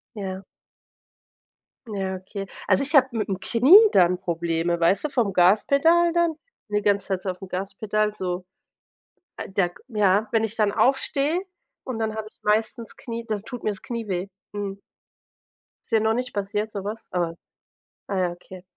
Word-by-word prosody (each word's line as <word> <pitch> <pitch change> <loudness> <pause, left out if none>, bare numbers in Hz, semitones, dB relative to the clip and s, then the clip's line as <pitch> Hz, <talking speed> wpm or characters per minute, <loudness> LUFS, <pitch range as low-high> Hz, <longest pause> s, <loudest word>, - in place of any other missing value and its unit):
Ja. 190 -2 -5 1.4
Ja, 195 -3 -3
okay. 195 +2 -7 0.2
Also 190 +3 +3
ich 285 +3 -2
habe 265 -2 +7
mit 220 -3 -2
dem 190 -1 -2
Knie 250 - +6 0.2
dann 180 -1 +4
Probleme, 170 -1 -1
weißt 170 - +3
du, - - +1
vom 225 -8 0
Gaspedal 280 - +4
dann, 340 -2 +2 0.3
ne, 210 0 0
ganze 200 -1 +1
Zeit 190 -2 -1
so 190 - -2
auf 180 +1 -8
'm 190 - -7
Gaspedal 205 +3 -2
so 180 -2 -4 0.9
äh, - - -6
da 190 -2 +1
k 175 - -19
ja, 210 -2 +2
wenn 225 -1 +2
ich 225 0 -2
dann 210 -2 +2
aufstehe 275 - +1 0.4
und 255 -3 -4
dann 220 -1 -1
habe 220 -1 -5
ich - - -40
meistens 220 +2 0
Knie 230 -1 -6
dann 215 -3 -2
tut 245 +3 -8
mir 215 - +1
das 200 - -8
Knie 230 -2 -5
weh, 185 -1 -2 0.2
mhm. 200 -1 -5 1.1
Ist - - -21
dir 220 - +4
noch 220 +1 +2
nicht 250 +1 -3
passiert, 205 +1 -2
sowas, 210 +3 -6
aber 170 -2 -1 0.7
ah, 195 -2 -1
ja, 180 -1 +1
okay. 180 +1 -13
205 Hz, 175 wpm, -24 LUFS, 190-225 Hz, 1.4 s, habe